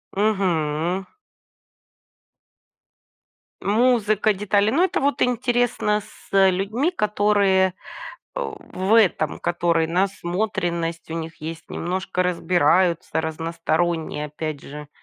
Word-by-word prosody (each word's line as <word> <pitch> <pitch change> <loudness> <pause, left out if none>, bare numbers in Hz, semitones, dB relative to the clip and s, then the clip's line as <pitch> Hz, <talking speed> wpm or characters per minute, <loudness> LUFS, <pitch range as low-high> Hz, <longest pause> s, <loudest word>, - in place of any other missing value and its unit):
Мгм. 180 -3 0 2.6
Музыка, 215 -1 +2
детали. 205 +1 +1
Но 310 +9 +3
это 375 - +1
вот 285 +1 0
интересно 245 -3 +1
с, - - -18
э, 195 -1 +6
людьми, 215 - 0
которые, 205 - +2 0.6
э, - - -3 0.3
в 190 +4 +1
этом 185 -8 +3
которые, 170 -1 +1
насмотренность 175 -2 -2
у - - -3
них 165 -1 -6
есть, 165 +1 -7
немножко 185 +1 -2
разбираются, 175 -1 +2
разносторонние, 165 -1 -2
опять 150 -1 -5
же, 150 +1 -9
185 Hz, 95 wpm, -23 LUFS, 165-210 Hz, 2.6 s, э